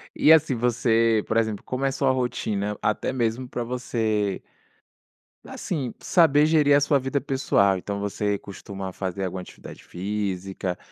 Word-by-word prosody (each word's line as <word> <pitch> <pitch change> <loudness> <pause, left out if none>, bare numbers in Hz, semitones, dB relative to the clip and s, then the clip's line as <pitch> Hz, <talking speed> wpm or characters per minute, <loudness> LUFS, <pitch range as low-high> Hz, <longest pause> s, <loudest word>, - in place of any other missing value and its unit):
E 155 - +5
assim, 155 -5 +5
você 115 -2 +2
por 110 - 0
exemplo, 110 -3 0
como 130 +2 -3
é - - +3
a - - -3
sua 135 -1 +1
rotina? 105 -5 -2
Até 105 +4 0
mesmo 120 0 -1
pra 120 - -3
você 110 -5 -1 1.0
assim, 140 -9 -4
saber 150 -4 +4
gerir 150 -3 +4
a - - +6
sua 145 0 +2
vida 135 +2 -1
pessoal, 100 -8 +2
então 100 +2 -4
você 100 0 -1
costuma 95 -1 -8
fazer 95 0 -3
alguma 95 0 -4
atividade - - -12
física? 95 -1 -4
115 Hz, 155 wpm, -24 LUFS, 100-130 Hz, 1.0 s, a